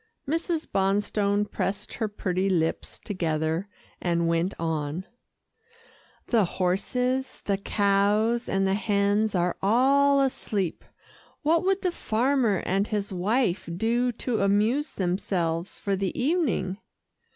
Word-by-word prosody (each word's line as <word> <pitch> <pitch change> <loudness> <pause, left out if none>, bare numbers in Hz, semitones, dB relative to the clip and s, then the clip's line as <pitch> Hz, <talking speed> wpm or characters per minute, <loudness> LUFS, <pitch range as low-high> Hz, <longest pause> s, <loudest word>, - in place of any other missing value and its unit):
Mrs. 330 +2 -1
Bonstone 200 +1 +1
pressed 200 -1 -3
her 225 - -1
pretty 190 -2 -1
lips 165 -3 -1
together, 165 -1 -1 0.3
and 170 -1 +1
went 170 +3 0
on, 160 +1 -2 1.2
"The 230 -4 +3
horses, 250 +8 -1
the 200 -1 0
cows 205 +4 +2
and 195 0 +1
the 190 - +2
hens 205 0 +1
are 175 0 +1
all 275 +7 +4
asleep. 210 -9 -1 0.6
What 325 +3 +3
would 390 +1 +1
the 365 - +1
farmer 240 - +1
and 195 +3 +1
his 205 -2 -2
wife 195 0 0
do 240 +4 +1
to 230 -1 -2
amuse 215 +9 +2
themselves 175 -2 -1
for 200 -1 -1
the 190 -1 -2
evening?" 250 - 0
200 Hz, 120 wpm, -26 LUFS, 185-240 Hz, 1.2 s, all